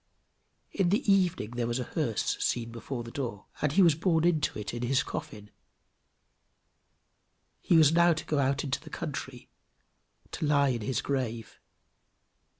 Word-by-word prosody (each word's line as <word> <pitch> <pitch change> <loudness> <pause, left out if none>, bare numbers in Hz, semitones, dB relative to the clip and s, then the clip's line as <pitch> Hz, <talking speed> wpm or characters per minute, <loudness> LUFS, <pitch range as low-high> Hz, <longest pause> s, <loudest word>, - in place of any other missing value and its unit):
In 190 -3 +1
the 205 +1 +3
evening 180 - +1
there 120 -1 -2
was 120 +1 -1
a 125 - -2
hearse - - -1
seen 115 -1 -1
before 120 +1 -6
the 115 - -9
door, 115 -8 -5 0.2
and 150 -1 +1
he 195 - +5
was 170 -3 +6
borne 165 +1 +1
into 160 -4 +1
it 105 +1 -5
in 120 - -4
his 130 +3 +1
coffin: 105 -1 -7 2.1
he 170 - +3
was 155 -2 +6
now 170 +1 +5
to 155 - -6
go 150 - 0
out 135 +1 +1
into 135 -3 -2
the 155 - -12
country, 135 -6 -6 0.8
to 155 - -2
lie 140 -1 +3
in 120 -3 -1
his 130 +4 -2
grave. 120 -5 -3
140 Hz, 160 wpm, -29 LUFS, 120-160 Hz, 2.1 s, was